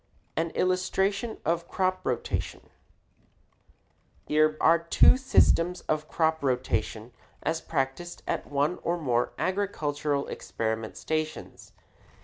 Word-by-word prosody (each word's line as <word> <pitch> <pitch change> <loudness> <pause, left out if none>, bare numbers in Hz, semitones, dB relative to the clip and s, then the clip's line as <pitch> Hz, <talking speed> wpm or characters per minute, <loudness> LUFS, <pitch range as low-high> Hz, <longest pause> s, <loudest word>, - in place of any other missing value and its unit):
AN 165 +1 0
ILLUSTRATION 190 +4 0
OF 170 +2 0
CROP 185 0 0
ROTATION - - -3 1.5
Here 155 0 +3
are 165 +1 +5
two 170 +8 +6
systems 180 -9 +3
of 155 0 -2
crop 160 -2 0
rotation 125 -3 -1 0.3
as 165 0 -1
practiced 140 +4 -3
at - - -2
one 145 +4 0
or 170 +1 0
more 125 -7 0
agricultural 150 -7 -1
experiment 110 0 -4
stations. 155 0 -4
160 Hz, 105 wpm, -28 LUFS, 140-180 Hz, 1.5 s, two